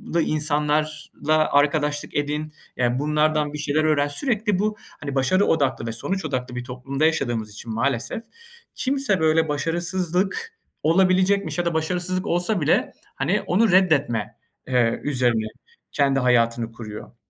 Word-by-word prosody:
lı 170 - +4
insanlarla 155 0 0
arkadaşlık 145 0 +1
edin, 150 +1 -2 0.2
ya 125 0 +1
bunlardan 150 0 +1
bir - - -4
şeyler 150 +1 0
öğren. 150 -2 +2
Sürekli 210 - -1
bu, 210 +1 0 0.2
hani 140 -1 -4
başarı 185 +10 +3
odaklı 135 -7 +1
ve - - -2
sonuç 190 +11 -3
odaklı 125 -4 -3
bir 125 - -4
toplumda 135 +4 -2
yaşadığımız 120 -9 0
için 110 +2 -7
maalesef, 120 - -1 0.5
kimse 265 -8 0
böyle 160 0 +2
başarısızlık 180 - -1 0.3
olabilecekmiş 185 +4 +3
ya 175 - 0
da 170 - 0
başarısızlık 180 +3 -1
olsa 175 +3 0
bile, 145 - +2 0.2
hani, - - 0
onu 210 +3 +2
reddetme, 155 - +2 0.3
eee, 125 -3 +2
üzerine 120 -6 +1 0.4
kendi 140 -1 +2
hayatını 115 -2 +2
kuruyor. 110 0 -9
150 Hz, 135 wpm, -23 LUFS, 130-175 Hz, 0.5 s, lı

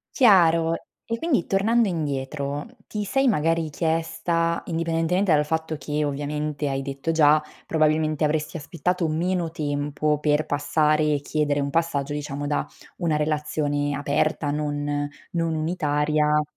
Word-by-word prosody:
Chiaro, 170 - +5 0.3
e 230 0 -2
quindi 275 - 0
tornando 220 +4 +3
indietro, 145 -3 -3 0.2
ti 210 -1 -4
sei 270 +7 +1
magari 165 - +1
chiesta, 165 +1 0
indipendentemente 165 +2 0
dal 150 -1 +4
fatto 160 +1 -2
che 150 0 -2
ovviamente 145 +1 -2
hai 135 0 -2
detto 140 +3 -3
già, 155 -1 +5 0.2
probabilmente 155 -1 +1
avresti 150 +2 0
aspettato 170 +3 -1
meno 170 +2 0
tempo 150 -1 -1
per 150 +1 +1
passare 150 +1 +2
e - - -1
chiedere 145 -1 0
un 140 0 -2
passaggio 150 -3 0
diciamo 145 -1 -4
da 145 - 0 0.3
una 165 -4 0
relazione 150 -1 -1
aperta, 145 +1 0
non 145 -1 -2 0.2
non 165 -1 0
unitaria 150 -2 +1
155 Hz, 130 wpm, -24 LUFS, 145-165 Hz, 0.3 s, Chiaro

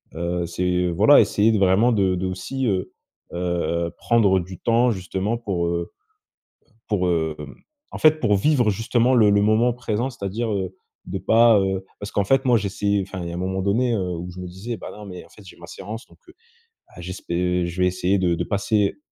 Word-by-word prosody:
Heu, 85 +1 -2
c'est 90 +1 -1
voilà 105 - +6
essayer 105 +1 +2
de 110 - +1
vraiment 100 +6 +4
de 95 -4 +2
de 90 +1 -3
aussi, 95 +9 -3
heu, 95 -4 -1 0.4
heu - - -4 0.5
heu, - - -7
prendre 105 -5 +3
du 90 0 -10
temps 120 +1 +2
justement 95 +3 -3
pour, 95 -7 -2
heu, 85 0 -3 1.0
pour, 90 -4 0
hem, 80 -2 0 0.6
en - - -6
fait 155 0 +4
pour 105 -6 +2
vivre 125 -1 +2
justement 115 +4 +1
le 110 -4 +5
le 100 - +3
moment 110 +3 +3
présent. 120 +1 -2
C'est-à-dire, 110 +1 -4
heu, 95 -2 -3 0.3
de 95 - -3
pas 115 +2 +5
heu, 95 0 -1 0.2
parce 100 0 -7
qu'en 100 - +1
fait 135 +5 +2
moi 120 -2 +4
j'essaye, 100 0 -1
enfin 95 -1 -6
il 85 - -5
y - - -6
a - - -6
un - - -5
moment 95 +1 -2
donné, 115 +6 +1
heu, 95 -5 -2
où 90 +2 -6
je 90 - -11
me 90 - -6
disais: 100 +6 -6
«Ben - - -8
non 105 - -11
mais 90 -2 -9
en - - -21
fait 105 - -17
j'ai - - -14
ma - - -11
séance 110 +5 -8
donc, - - -22
heu, - - -15 0.6
ah 90 - -12
j'espè 90 0 -2
heu, - - -1
je 85 +1 -4
vais 90 - +4
essayer 90 +2 0
de 90 -2 +1
de - - -2
passer, 100 -1 0
100 Hz, 220 wpm, -22 LUFS, 90-115 Hz, 1.0 s, voilà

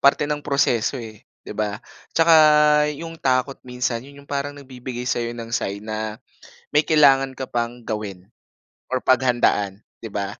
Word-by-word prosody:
parte 140 +1 +4
ng 145 -1 -3
proseso 135 -3 +1
eh, 110 -3 -11 0.2
'di - - -7
ba. 105 -1 -2 0.3
Tsaka, 165 0 +5 0.6
'yong 165 +2 -8
takot 130 -1 0
minsan, 125 -1 -2
'yon 140 0 -13
yung - - -29
parang 145 0 -2
nagbibigay 130 -3 -7
sayo 120 0 -1
ng 115 -1 -7
sign 100 -2 -3
na, 110 0 -4 0.6
may 150 +1 +5
kailangan 135 -4 +5
ka 130 - -4
pang 120 0 -3
gawin 100 -4 -5 0.6
or 130 - +1
paghandaan, 120 -6 +2 0.2
'di 115 - -5
ba. 100 0 -3
125 Hz, 155 wpm, -22 LUFS, 110-140 Hz, 0.6 s, Tsaka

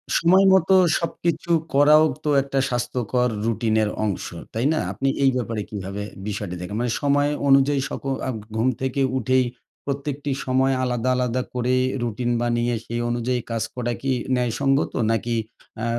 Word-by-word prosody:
সময় 185 +3 +5
মতো 190 0 +4 0.2
সবকিছু 170 +1 -2 0.2
করাও 150 +2 +6 0.2
তো 150 - -1
একটা 135 0 -2
স্বাস্থ্যকর 125 0 0 0.2
রুটিনের 110 -1 +1 0.2
অংশ, 100 - -2 0.3
তাই 115 +4 -1
না? - - 0
আপনি 120 +8 -2 0.2
এই 135 - +5
ব্যাপারে 115 -3 -3
কীভাবে 100 0 -5 0.3
বিষয়টি 100 -3 -4
দেখেন? 90 +3 -6
মানে 120 - 0
সময় 145 0 +2 0.2
অনুযায়ী 135 +1 +4
সক - - -6 0.2
আ - - -1 0.3
ঘুম 115 +3 +1
থেকে 130 +1 -1 0.2
উঠেই 130 +1 +2 0.4
প্রত্যেকটি 140 0 -3
সময় 130 +1 +2
আলাদা, 125 0 0
আলাদা 125 0 0
করে 125 0 0 0.3
রুটিন 120 +1 -2
বানিয়ে 120 0 0
সেই 120 +1 -3
অনুযায়ী 120 +1 -1
কাজ 115 -2 -1
করা 120 -1 -2
কি 135 -1 0 0.2
ন্যায়সঙ্গত? 130 +3 +1 0.2
নাকি 115 +1 -1 0.5
আ - - 0
125 Hz, 150 wpm, -23 LUFS, 115-135 Hz, 0.5 s, করাও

